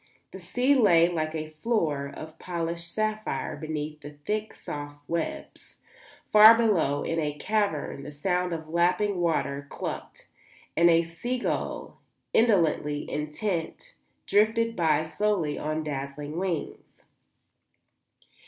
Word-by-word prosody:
The 190 Hz, -, -9 dB
sea 245 Hz, +10 st, +2 dB
lay 180 Hz, -10 st, +5 dB
like 160 Hz, -2 st, -2 dB
a 155 Hz, 0 st, -4 dB
floor 155 Hz, -6 st, -1 dB
of 155 Hz, +2 st, -10 dB
polished 170 Hz, -1 st, -3 dB
sapphire 215 Hz, -9 st, -2 dB
beneath 155 Hz, 0 st, -5 dB
the 145 Hz, 0 st, -9 dB
thick, 215 Hz, +1 st, -2 dB
soft 145 Hz, 0 st, -7 dB
webs. 170 Hz, -1 st, -5 dB, 0.5 s
Far 215 Hz, +2 st, +10 dB
below, 185 Hz, -11 st, +2 dB
in 165 Hz, -, -1 dB
a 150 Hz, -2 st, -2 dB
cavern, 200 Hz, -7 st, -1 dB
the 145 Hz, -, -8 dB
sound 180 Hz, +4 st, -1 dB
of 160 Hz, -2 st, -4 dB
lapping 180 Hz, +4 st, +1 dB
water 140 Hz, -4 st, 0 dB
clucked, -, -, -6 dB, 0.5 s
and 170 Hz, +1 st, +5 dB
a 165 Hz, 0 st, +5 dB
sea 170 Hz, +10 st, -4 dB
gull, 245 Hz, -, -3 dB, 0.3 s
indolently 165 Hz, -9 st, +2 dB
intent, 165 Hz, -, -3 dB, 0.3 s
drifted 230 Hz, +2 st, +2 dB
by 155 Hz, -4 st, +2 dB
slowly 170 Hz, -3 st, -1 dB
on 155 Hz, +1 st, -2 dB
dazzling 145 Hz, +2 st, -5 dB
wings. 180 Hz, -5 st, -4 dB
165 Hz, 120 wpm, -27 LUFS, 150-210 Hz, 0.5 s, Far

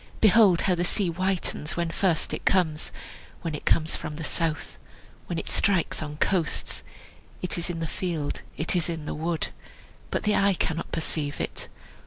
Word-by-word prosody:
Behold 210 Hz, -4 st, +6 dB
how 190 Hz, -, +3 dB
the 175 Hz, 0 st, 0 dB
sea 185 Hz, +1 st, +2 dB
whitens 180 Hz, -3 st, -1 dB
When 170 Hz, -1 st, 0 dB
first 170 Hz, -2 st, +1 dB
it -, -, -3 dB
comes, 165 Hz, -5 st, +2 dB, 0.5 s
When 165 Hz, -2 st, -2 dB
it 150 Hz, -, -5 dB
comes 160 Hz, 0 st, +3 dB
from 155 Hz, -1 st, -5 dB
the 160 Hz, -, -5 dB
south, 160 Hz, 0 st, -2 dB, 0.5 s
When 175 Hz, -, -2 dB
it -, -, -3 dB
strikes 190 Hz, -5 st, +2 dB
on 150 Hz, -1 st, -5 dB
coasts 175 Hz, 0 st, +1 dB, 0.6 s
It 180 Hz, -, -1 dB
is 170 Hz, 0 st, -2 dB
in 165 Hz, -1 st, -3 dB
the -, -, 0 dB
field, 170 Hz, -5 st, -2 dB, 0.2 s
it 160 Hz, +4 st, +2 dB
is 175 Hz, -1 st, +1 dB
in 160 Hz, -3 st, -3 dB
the -, -, -3 dB
wood, 160 Hz, +1 st, -1 dB, 0.6 s
But -, -, -1 dB
the 210 Hz, -1 st, +3 dB
eye 195 Hz, -1 st, +4 dB
cannot 165 Hz, -1 st, -2 dB
perceive 150 Hz, -2 st, -1 dB
it. -, -, -3 dB
170 Hz, 180 wpm, -27 LUFS, 155-185 Hz, 0.6 s, Behold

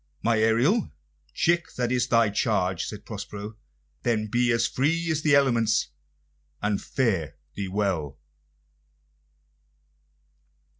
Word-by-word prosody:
"My 115 Hz, -1 st, +2 dB
Ariel, 120 Hz, -, +2 dB, 0.4 s
chick, 175 Hz, 0 st, 0 dB
that 120 Hz, -1 st, -1 dB
is 125 Hz, -1 st, +1 dB
thy 115 Hz, -3 st, +3 dB
charge," 95 Hz, -4 st, 0 dB
said 105 Hz, -1 st, -8 dB
Prospero. 105 Hz, 0 st, -7 dB, 0.5 s
"Then 115 Hz, -3 st, 0 dB
be 120 Hz, +2 st, +2 dB
free 160 Hz, +8 st, +1 dB
as 155 Hz, -1 st, 0 dB
the 155 Hz, -2 st, +4 dB
elements, 120 Hz, -5 st, +2 dB, 0.7 s
and 105 Hz, -1 st, -1 dB
fare 100 Hz, -, -1 dB, 0.2 s
thee 100 Hz, -1 st, -4 dB
well!" 90 Hz, -8 st, -1 dB
115 Hz, 105 wpm, -26 LUFS, 105-130 Hz, 0.7 s, the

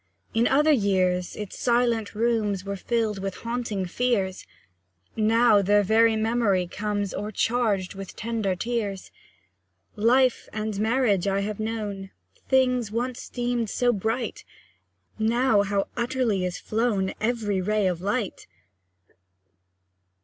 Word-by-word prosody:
In 230 Hz, +2 st, +3 dB
other 300 Hz, +3 st, +4 dB
years, 185 Hz, -7 st, +1 dB
its 210 Hz, -2 st, -7 dB
silent 235 Hz, -3 st, +1 dB
rooms 215 Hz, -4 st, 0 dB
Were 200 Hz, 0 st, -3 dB
filled 220 Hz, 0 st, -1 dB
with 195 Hz, -1 st, -4 dB
haunting 230 Hz, -4 st, -3 dB
fears; 195 Hz, -2 st, -1 dB, 0.7 s
Now, 220 Hz, -1 st, +4 dB
their 205 Hz, +1 st, +3 dB
very 225 Hz, +3 st, +4 dB
memory 220 Hz, -4 st, +1 dB
comes 205 Hz, +2 st, -3 dB
O'ercharged 210 Hz, -1 st, 0 dB
with 195 Hz, -1 st, -9 dB
tender 220 Hz, -4 st, -2 dB
tears. 205 Hz, -2 st, -3 dB, 0.8 s
Life 250 Hz, +4 st, +2 dB
and 215 Hz, -2 st, -3 dB
marriage 220 Hz, -4 st, +2 dB
I 195 Hz, 0 st, +1 dB
have 210 Hz, +1 st, -4 dB
known. 210 Hz, -3 st, -4 dB, 0.4 s
Things 255 Hz, -4 st, +2 dB
once 245 Hz, +2 st, -3 dB
deemed 240 Hz, -2 st, -1 dB
so 245 Hz, +3 st, +2 dB
bright; 225 Hz, +4 st, -2 dB, 0.8 s
Now, 225 Hz, 0 st, +3 dB
how 200 Hz, 0 st, 0 dB
utterly 235 Hz, -6 st, 0 dB
is 180 Hz, 0 st, -3 dB
flown 215 Hz, -4 st, -1 dB
Every 215 Hz, -4 st, 0 dB
ray 210 Hz, +2 st, +1 dB
of 180 Hz, -2 st, 0 dB
light! 205 Hz, +2 st, -2 dB
215 Hz, 120 wpm, -25 LUFS, 195-235 Hz, 0.8 s, other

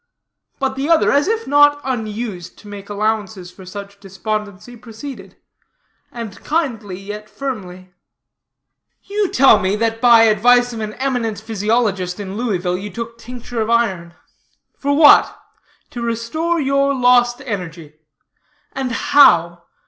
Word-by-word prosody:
But 265 Hz, -1 st, -2 dB
the 275 Hz, +3 st, -3 dB
other, 330 Hz, -1 st, +4 dB
as 285 Hz, +4 st, +2 dB
if 450 Hz, +1 st, -1 dB
not 290 Hz, +1 st, +4 dB
unused 220 Hz, -7 st, -5 dB
to 210 Hz, -, -16 dB
make 205 Hz, -1 st, -10 dB
allowances 205 Hz, -3 st, -3 dB
for 185 Hz, 0 st, -14 dB
such 200 Hz, +1 st, -9 dB
despondency, 205 Hz, +3 st, -6 dB
proceeded; 235 Hz, +4 st, -10 dB, 0.7 s
and 230 Hz, -5 st, -8 dB
kindly, 235 Hz, -, -2 dB
yet 210 Hz, +2 st, -8 dB
firmly: 185 Hz, -9 st, -7 dB, 1.1 s
"You 405 Hz, -1 st, -1 dB
tell 255 Hz, -5 st, +5 dB
me, 190 Hz, 0 st, 0 dB
that 225 Hz, +1 st, -2 dB
by 235 Hz, -2 st, +7 dB
advice 245 Hz, +3 st, +3 dB
of 225 Hz, -, -6 dB
an 215 Hz, -1 st, -5 dB
eminent 245 Hz, -5 st, -2 dB
physiologist 210 Hz, -4 st, -1 dB
in 195 Hz, -1 st, -6 dB
Louisville, 185 Hz, -6 st, -2 dB
you 205 Hz, +2 st, -6 dB
took 230 Hz, +3 st, -7 dB
tincture 240 Hz, 0 st, -6 dB
of 220 Hz, -, -2 dB
iron. 190 Hz, -8 st, 0 dB, 0.6 s
For 285 Hz, 0 st, -1 dB
what? 300 Hz, -2 st, +6 dB, 0.5 s
To 240 Hz, -, -6 dB
restore 235 Hz, +9 st, -2 dB
your 275 Hz, 0 st, +1 dB
lost 245 Hz, -1 st, +3 dB
energy. 165 Hz, -, -7 dB, 0.7 s
And 265 Hz, -2 st, -3 dB
how? 175 Hz, -, +4 dB
225 Hz, 135 wpm, -18 LUFS, 200-250 Hz, 1.1 s, by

